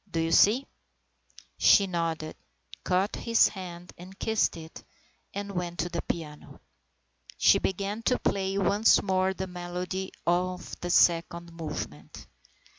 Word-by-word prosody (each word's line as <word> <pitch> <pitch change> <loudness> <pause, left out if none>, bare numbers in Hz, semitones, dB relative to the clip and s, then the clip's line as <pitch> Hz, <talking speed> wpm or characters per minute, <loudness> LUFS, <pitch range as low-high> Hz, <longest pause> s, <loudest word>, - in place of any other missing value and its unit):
Do 165 - -2
you 165 0 0
see? 225 +10 +5 0.5
" - - -23
She 200 - +6
nodded, 165 -4 -3 0.5
caught 190 +3 0
his 230 -1 +3
hand 180 -3 -9
and 185 +2 -12
kissed 220 -5 0
it, 160 0 -11 0.5
and 200 0 -5
went 175 -2 -4
to 175 - -1
the 170 0 -3
piano. 150 -3 -6 0.8
She - - +5
began 200 +3 -2
to 250 - +2
play 195 0 -1
once 200 +3 +4
more 190 -1 +1
the 190 - -3
melody 180 +1 -5
of 180 +1 -1
the 175 - -4
second 170 0 +2
movement. 150 - -7
180 Hz, 135 wpm, -28 LUFS, 170-195 Hz, 0.8 s, She